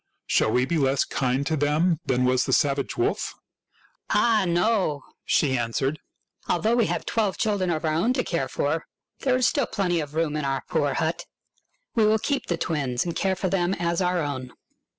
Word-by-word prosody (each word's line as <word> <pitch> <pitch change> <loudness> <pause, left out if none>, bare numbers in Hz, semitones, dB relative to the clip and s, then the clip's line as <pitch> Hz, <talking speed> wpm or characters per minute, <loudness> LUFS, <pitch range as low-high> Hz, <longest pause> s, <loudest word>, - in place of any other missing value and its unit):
Shall - - +2
we 125 +2 +2
be 160 +4 0
less 135 -1 +2
kind 130 +1 -1
to 160 - 0
them 155 +3 +2
than 125 0 +2
was 125 0 +2
the - - -1
savage 140 -1 +1
wolf? 370 +4 -1 0.2
" - - -35
" - - -48
Ah, 225 -4 +3
no! 175 -4 +1
" - - -48
she 135 -4 +2
answered. 130 +5 -1 0.2
" - - -30
Although 215 +7 +2
we 235 -3 +3
have - - -2
twelve 210 -4 0
children 205 -4 0
of 165 -1 -1
our 155 - +1
own 185 +11 +2
to 255 - 0
care 165 -7 -1
for, 160 +3 -2 0.3
there 260 -2 +1
is 255 - +2
still 280 +1 +1
plenty 180 -4 0
of 150 -1 -5
room 160 -2 0
in 150 - -2
our 135 -1 -1
poor - - 0
hut. - - -1 0.7
We 220 -2 +3
will 215 +1 +4
keep 280 +5 -2
the 170 - -1
twins 140 -6 -1
and 170 - -3
care 190 -1 +1
for 185 - -2
them 180 0 +1
as 170 +1 -1
our 180 -2 +1
own." 130 -3 -5
165 Hz, 210 wpm, -25 LUFS, 140-195 Hz, 0.7 s, will